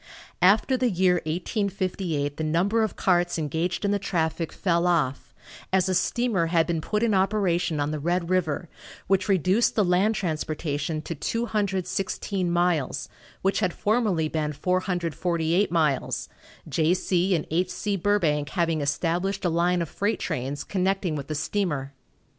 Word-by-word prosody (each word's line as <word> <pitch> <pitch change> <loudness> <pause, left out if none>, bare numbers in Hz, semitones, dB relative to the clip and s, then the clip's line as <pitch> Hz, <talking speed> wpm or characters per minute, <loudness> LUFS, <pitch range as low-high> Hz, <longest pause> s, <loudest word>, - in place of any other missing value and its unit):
After 210 +8 +4
the 250 -1 +2
year 180 -2 +2
1858 180 -4 -2
the 160 - -2
number 180 +8 +2
of 220 - -1
carts 175 -2 +2
engaged 165 +5 -1
in 200 - +2
the 205 - +1
traffic 165 -3 -1
fell 170 -1 +1
off, 155 -7 0 0.4
as 190 -1 +3
a 190 - +1
steamer 190 -1 +1
had 165 -1 +3
been 165 -2 -1
put 210 +7 -1
in 230 -2 +2
operation 190 -5 +1
on 145 +1 0
the 155 - -3
Red 175 +3 0
river, 175 -2 0 0.4
which 195 +1 +1
reduced 190 +4 +3
the 210 - +3
land 185 +5 +2
transportation 155 -3 -2
to 165 - -4
216 195 -2 -2
miles, 170 -6 0 0.3
which 195 +1 +2
had 185 -5 0
formerly 205 -7 +1
been 155 -1 -2
448 175 0 0
miles, 155 -6 0 0.4
J. 165 +2 +2
C. 185 0 +1
& - - -24
H. 180 +3 +1
C. 205 +1 -2
Burbank 165 -7 +1
having 165 -4 0
established 175 +7 -1
a - - +3
line 175 +1 +2
of - - -6
freight 205 +2 -1
trains 135 +3 -3
connecting 190 -3 0
with 140 -2 -5
the 155 - -3
steamer. 145 -5 -2
175 Hz, 155 wpm, -25 LUFS, 160-195 Hz, 0.4 s, After